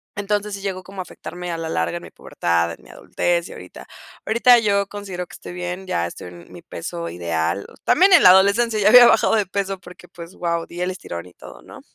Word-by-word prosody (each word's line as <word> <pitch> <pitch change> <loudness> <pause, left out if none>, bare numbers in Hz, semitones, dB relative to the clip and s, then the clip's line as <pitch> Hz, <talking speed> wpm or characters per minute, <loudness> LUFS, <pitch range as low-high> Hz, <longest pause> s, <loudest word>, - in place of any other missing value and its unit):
Entonces, 205 0 -2
sí 200 - -9
llegó 190 -2 -4
como 190 +1 -8
a - - -4
afectarme 180 0 -8
a 165 - -3
la 165 -1 -4
larga 170 - -2
en 170 - -10
mi - - -11
pubertad, 85 0 -2
en 65 - -12
mi - - -19
adultez 170 - -2
y - - -11
ahorita. 90 - -12 0.4
Ahorita 235 +2 +5
yo 200 -3 +1
considero 195 -3 -7
que - - -16
estoy - - -10
bien, 180 +1 -5
ya 85 - -1
estoy 85 - -10
en 85 0 -15
mi - - -12
peso 85 0 -6
ideal. 85 +2 -3 0.2
También 380 +4 +4
en 345 - +7
la - - +9
adolescencia 205 +4 +3
ya 205 0 +4
había 245 +2 +9
bajado 235 - +4
de 210 - +1
peso 195 0 -3
porque, 180 0 -15
pues 170 0 -12
wao, 170 -1 -2
di 175 +1 -9
el 180 - -1
estirón 90 - -7
y 90 - -18
todo, 60 - -14
¿no? - - -14
180 Hz, 235 wpm, -21 LUFS, -, 0.4 s, la